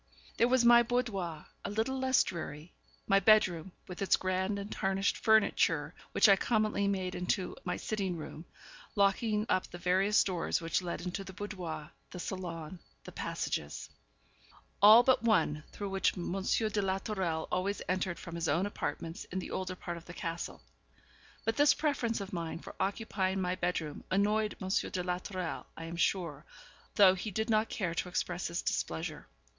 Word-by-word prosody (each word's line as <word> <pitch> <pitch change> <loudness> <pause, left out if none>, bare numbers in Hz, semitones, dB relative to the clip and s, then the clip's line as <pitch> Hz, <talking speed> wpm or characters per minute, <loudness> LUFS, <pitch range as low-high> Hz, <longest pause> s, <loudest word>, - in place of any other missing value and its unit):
There 235 - +4
was 250 -1 +3
my 240 0 +8
boudoir, 210 -10 -2 0.2
a - - -3
little 225 +6 -1
less 260 -1 +4
dreary 165 -2 -6 0.3
my 195 - +4
bedroom, 190 -4 +4 0.2
with 180 0 -8
its 195 - +4
grand 185 +2 -1
and 200 +1 -6
tarnished 195 +1 0
furniture, 220 -2 +3 0.2
which - - +5
I 200 - +8
commonly 215 -1 +1
made 190 -2 -1
into 180 +1 -1
my - - -1
sitting 195 -5 -2
room, 155 +1 -8 0.5
locking 210 +2 +2
up 185 - +1
the 175 - -8
various 190 +4 +3
doors 180 -4 -1
which 165 +2 0
led 175 -1 -4
into 180 +2 -4
the 190 0 -10
boudoir, 180 -7 -6 0.2
the - - -9
salon, 175 -2 -5 0.2
the - - -9
passages 75 0 -4 0.9
all 215 +4 +10
but 260 0 +4
one, 210 -10 +2
through 200 -1 -5
which 195 0 +1
M. 175 - -3
de 215 +1 +1
la 190 -1 0
Tourelle 190 -6 -2
always 195 +3 -1
entered 185 -1 -1
from 170 - -9
his 170 -1 -2
own 165 +7 +2
apartments 165 -4 -4
in 185 - -6
the 185 - -4
older 185 0 -3
part 175 -1 -6
of 170 - -12
the 175 - -10
castle. 165 0 -5 0.8
But 225 - 0
this 290 0 +6
preference 260 -7 0
of 200 -1 -7
mine 165 -2 -3
for - - -10
occupying 195 -2 -1
my 180 -1 0
bedroom 175 -4 -2
annoyed 210 +2 +1
M. 190 - -5
de 185 -1 0
la 180 0 -1
Tourelle, 185 -3 -5
I 165 - -6
am 165 +1 -6
sure, 170 -5 0 0.5
though 195 -3 +8
he 190 +3 -4
did 220 +3 -1
not 215 +1 +2
care 175 -6 -2
to 180 - -2
express 175 0 -2
his 170 +1 -3
displeasure. 160 -2 -3
190 Hz, 175 wpm, -32 LUFS, 175-210 Hz, 0.9 s, all